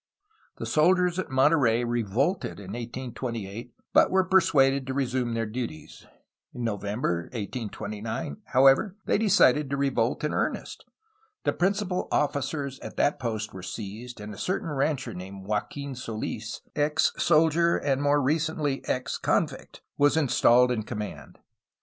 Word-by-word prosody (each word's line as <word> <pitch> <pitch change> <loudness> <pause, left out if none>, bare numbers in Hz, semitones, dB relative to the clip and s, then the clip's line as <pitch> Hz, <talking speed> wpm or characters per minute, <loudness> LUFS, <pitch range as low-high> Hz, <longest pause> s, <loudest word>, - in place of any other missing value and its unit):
The - - -5
soldiers 180 +3 +3
at 185 - -3
Monterey 130 -3 +3
revolted 120 - -1
in 95 -1 -8
1828, 120 -2 -6 0.2
but - - +6
were 190 0 +3
persuaded 140 -8 +3
to 130 - -3
resume 125 -3 -1
their 115 0 0
duties. 110 -9 -6 0.5
In 125 - -4
No 115 -3 0
vember 100 -4 -2
1829, 110 - -5
however, 135 - +4
they - - +2
decided 150 - +4
to 140 - -1
revolt 135 -4 0
in 150 - 0
earnest. - - -3 0.6
The - - +1
principal 190 0 0
officers 140 -1 -1
at - - -9
that 145 - +2
post 110 -3 -3
were 95 - -8
seized, 110 +5 -7
and 105 0 -7
a - - -10
cer 185 - 0
tain 175 - -5
rancher 135 -4 -1
named 95 +1 -8
Joaquin 135 +7 -3
Soils, 115 -4 -5
ex 150 +1 +2
soldier 165 +1 +4
and 135 -1 0
more 145 0 +3
re 145 +5 +3
cently 150 -3 -1
ex 130 0 -1
convict, - - -1 0.2
was 145 +1 +4
installed 125 -4 +4
in 115 -3 0
command. 105 -1 -7
130 Hz, 145 wpm, -27 LUFS, 115-150 Hz, 0.6 s, but